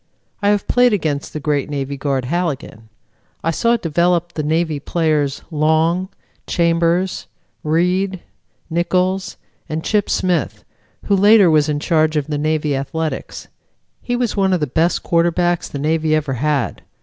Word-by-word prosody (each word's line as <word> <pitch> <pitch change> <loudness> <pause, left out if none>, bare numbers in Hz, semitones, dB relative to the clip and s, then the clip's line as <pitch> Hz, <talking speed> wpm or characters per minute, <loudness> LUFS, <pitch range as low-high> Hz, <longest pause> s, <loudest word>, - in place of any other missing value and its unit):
I 205 - +2
have 205 -1 +1
played 245 -2 +4
against 155 -7 -2
the 155 - -5
great 145 -2 -1
Navy 140 -1 -3
guard 135 -2 -2
Halligan. 140 -8 -3 0.5
I 165 - +1
saw 235 +8 +2
developed 175 -1 0
the 155 - -2
Navy 160 0 0
players, 150 -3 0
Long, 160 +4 +1 0.4
Chambers, 170 +2 +1 0.4
Reed, 180 +4 +1 0.5
Nichols 180 +3 -1 0.3
and 160 +1 -3
Chip 210 -2 0
Smith, 180 -2 -1 0.4
who 200 - +2
later 200 -2 +6
was 155 -1 +3
in 145 -1 0
charge 155 -1 +1
of 145 - 0
the 150 -1 -3
Navy 155 -1 0
athletics. 150 +4 -4 0.5
He 245 - -2
was 245 -2 -1
one 195 -2 +2
of 180 - +1
the 150 - 0
best 160 +6 0
quarterbacks 175 +1 +1
the - - -6
Navy 155 +2 +1
ever 150 -3 -1
had. 145 +3 -1
165 Hz, 150 wpm, -19 LUFS, 150-180 Hz, 0.5 s, later